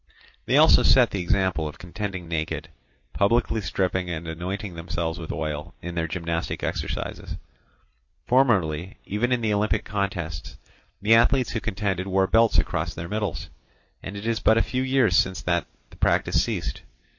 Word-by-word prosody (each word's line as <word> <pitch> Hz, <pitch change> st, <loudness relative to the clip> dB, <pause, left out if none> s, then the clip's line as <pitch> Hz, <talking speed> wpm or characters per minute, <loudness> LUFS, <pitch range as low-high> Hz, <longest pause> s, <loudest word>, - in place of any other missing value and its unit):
They -, -, +4 dB
also -, -, +7 dB
set -, -, +5 dB
the 100 Hz, -, -2 dB
example 90 Hz, -3 st, +1 dB
of 75 Hz, -, -8 dB
contending 90 Hz, 0 st, -5 dB
naked, 80 Hz, -1 st, -3 dB, 0.4 s
publicly 115 Hz, +2 st, +2 dB
stripping 90 Hz, 0 st, -1 dB
and 85 Hz, -1 st, -4 dB
anointing 90 Hz, +4 st, -4 dB
themselves 85 Hz, 0 st, -3 dB
with 80 Hz, -, -5 dB
oil 75 Hz, 0 st, -4 dB
in 85 Hz, -, -6 dB
their 80 Hz, -1 st, -1 dB
gymnastic 85 Hz, 0 st, -3 dB
exercises. -, -, -4 dB, 0.9 s
Formerly, 100 Hz, -, +2 dB
even 110 Hz, +5 st, -1 dB
in 125 Hz, -1 st, +2 dB
the 110 Hz, -2 st, +1 dB
Olympic 105 Hz, +1 st, +1 dB
contests, 95 Hz, -6 st, -3 dB, 0.5 s
the 110 Hz, +2 st, +5 dB
athletes 125 Hz, +2 st, +4 dB
who 115 Hz, -, -1 dB
contended 95 Hz, -2 st, -2 dB
wore 95 Hz, 0 st, +2 dB
belts 115 Hz, +4 st, +4 dB
across -, -, 0 dB
their 80 Hz, +1 st, -5 dB
middles; 105 Hz, -10 st, -3 dB, 0.5 s
and 95 Hz, +2 st, -7 dB
it 100 Hz, -, -7 dB
is 115 Hz, -1 st, 0 dB
but 110 Hz, -, +4 dB
a 115 Hz, -, +4 dB
few 130 Hz, -, -2 dB
years 130 Hz, -7 st, +3 dB
since 95 Hz, +1 st, +2 dB
that 85 Hz, 0 st, 0 dB, 0.2 s
the -, -, -15 dB
practice -, -, +2 dB
ceased. -, -, -3 dB
95 Hz, 160 wpm, -25 LUFS, 85-110 Hz, 0.9 s, also